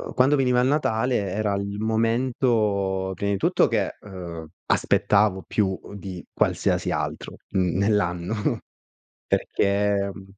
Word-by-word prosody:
quando 135 Hz, +3 st, +4 dB
veniva 125 Hz, -2 st, +3 dB
il 125 Hz, -, +2 dB
Natale 125 Hz, -4 st, +1 dB
era 105 Hz, +1 st, -1 dB
il 100 Hz, +1 st, -3 dB
momento, 110 Hz, -4 st, +1 dB
prima 100 Hz, +2 st, -2 dB
di 100 Hz, -, +1 dB
tutto -, -, +3 dB
che, -, -, -1 dB
uhm, 85 Hz, -5 st, -8 dB, 0.2 s
aspettavo 100 Hz, -2 st, +2 dB
più, 95 Hz, -3 st, 0 dB
uhm, -, -, -12 dB
di 95 Hz, -3 st, -7 dB
qualsiasi -, -, +1 dB
altro, -, -, -3 dB
mhmm, 90 Hz, -2 st, 0 dB
nell'anno, 95 Hz, -2 st, +1 dB, 0.9 s
perché, 100 Hz, 0 st, +1 dB
mhmm, 95 Hz, 0 st, -11 dB
100 Hz, 125 wpm, -24 LUFS, 95-110 Hz, 0.9 s, quando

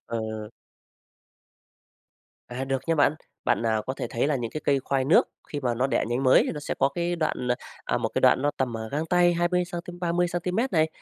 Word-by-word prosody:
Ờ. 110 Hz, -2 st, -4 dB, 2.0 s
À, 125 Hz, +2 st, -4 dB
được 135 Hz, -1 st, -2 dB
nha 165 Hz, -, +2 dB
bạn. 145 Hz, 0 st, +3 dB, 0.3 s
Bạn, 120 Hz, -1 st, +2 dB
à, 110 Hz, -1 st, +2 dB
có 130 Hz, -, -1 dB
thể -, -, -3 dB
thấy 120 Hz, +4 st, 0 dB
là 150 Hz, -, +1 dB
những 120 Hz, -3 st, -4 dB
cái 155 Hz, -, -5 dB
cây 140 Hz, -1 st, +2 dB
khoai 135 Hz, 0 st, 0 dB
nước 150 Hz, -, +4 dB, 0.2 s
khi 145 Hz, -, -4 dB
mà 120 Hz, -2 st, 0 dB
nó 125 Hz, +3 st, +1 dB
đẻ 135 Hz, -, +1 dB
nhánh 120 Hz, +3 st, -1 dB
mới 130 Hz, -1 st, +6 dB
nó 150 Hz, -, -5 dB
sẽ -, -, -3 dB
có 135 Hz, -, +4 dB
cái 175 Hz, +4 st, -2 dB
đoạn, 155 Hz, -6 st, -1 dB, 0.4 s
à, -, -, 0 dB
một -, -, -1 dB
cái -, -, +1 dB
đoạn 130 Hz, -, +5 dB
nó 145 Hz, -, +2 dB
tầm, 125 Hz, -3 st, -1 dB
ờ, 110 Hz, 0 st, -4 dB
gang 155 Hz, +5 st, -2 dB
tay 175 Hz, +1 st, +4 dB
20 175 Hz, +1 st, +1 dB
xăng-ti, 175 Hz, 0 st, -6 dB
30 175 Hz, 0 st, +1 dB
xăng-ti-mét 180 Hz, +9 st, -1 dB
này. 160 Hz, -1 st, +3 dB
145 Hz, 225 wpm, -26 LUFS, 125-170 Hz, 2.0 s, mới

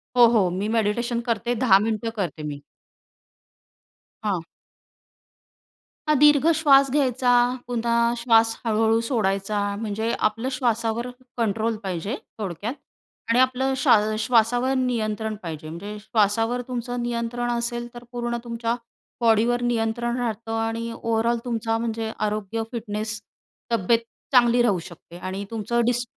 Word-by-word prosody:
हो, 245 Hz, -1 st, +8 dB
हो. 220 Hz, -6 st, +3 dB
मी 190 Hz, +4 st, -2 dB
मेडिटेशन 230 Hz, +2 st, 0 dB
करते 235 Hz, +2 st, 0 dB
10 220 Hz, -5 st, +5 dB
मिनिटं 225 Hz, +2 st, -1 dB
करते 180 Hz, -6 st, -3 dB
मी. 145 Hz, -1 st, -5 dB, 1.6 s
हां. 200 Hz, -5 st, 0 dB, 1.7 s
हां, 305 Hz, -, +5 dB
दीर्घ 295 Hz, 0 st, +6 dB
श्वास 275 Hz, -3 st, +5 dB
घ्यायचा, 260 Hz, -3 st, +2 dB, 0.4 s
पुन्हा 235 Hz, -1 st, -1 dB, 0.2 s
श्वास 225 Hz, -1 st, +4 dB
हळू-हळू 225 Hz, 0 st, +3 dB
सोडायचा. 200 Hz, -3 st, 0 dB, 0.2 s
म्हणजे 220 Hz, +1 st, -2 dB, 0.2 s
आपलं 225 Hz, +4 st, -4 dB
श्वासावर 235 Hz, -1 st, 0 dB, 0.3 s
कंट्रोल 225 Hz, 0 st, 0 dB
पाहिजे 190 Hz, +4 st, -3 dB, 0.2 s
थोडक्यात 200 Hz, +3 st, -3 dB, 0.6 s
आणि 230 Hz, +2 st, +4 dB
आपलं 260 Hz, +1 st, +2 dB
श्वा 240 Hz, -, +5 dB, 0.3 s
श्वासावर 245 Hz, +2 st, +3 dB
नियंत्रण 220 Hz, -3 st, -1 dB
पाहिजे, 155 Hz, -2 st, -6 dB
म्हणजे 200 Hz, +6 st, -7 dB
श्वासावर 225 Hz, +3 st, +1 dB
तुमचं 245 Hz, -1 st, -3 dB
नियंत्रण 240 Hz, 0 st, -2 dB
असेल 240 Hz, 0 st, -2 dB
तर 240 Hz, 0 st, -10 dB
पूर्ण 240 Hz, -1 st, -2 dB
तुमच्या 230 Hz, 0 st, -2 dB, 0.5 s
बॉडीवर 230 Hz, +1 st, +3 dB
नियंत्रण 235 Hz, 0 st, 0 dB
राहतं 225 Hz, -1 st, -3 dB
आणि 225 Hz, +1 st, -2 dB
ओव्हरऑल 230 Hz, +1 st, 0 dB
तुमचा 225 Hz, -1 st, -1 dB
म्हणजे 225 Hz, -1 st, -3 dB, 0.2 s
आरोग्य, 215 Hz, +1 st, -3 dB
फिटनेस 220 Hz, -2 st, -4 dB, 0.5 s
तब्येत 230 Hz, +1 st, +3 dB, 0.3 s
चांगली 240 Hz, -2 st, +5 dB
राहू 205 Hz, -7 st, +2 dB
शकते 170 Hz, 0 st, -13 dB
आणि 190 Hz, +2 st, -5 dB
तुमचं 230 Hz, +2 st, 0 dB
डिस 245 Hz, 0 st, +1 dB
230 Hz, 125 wpm, -24 LUFS, 215-240 Hz, 1.7 s, हो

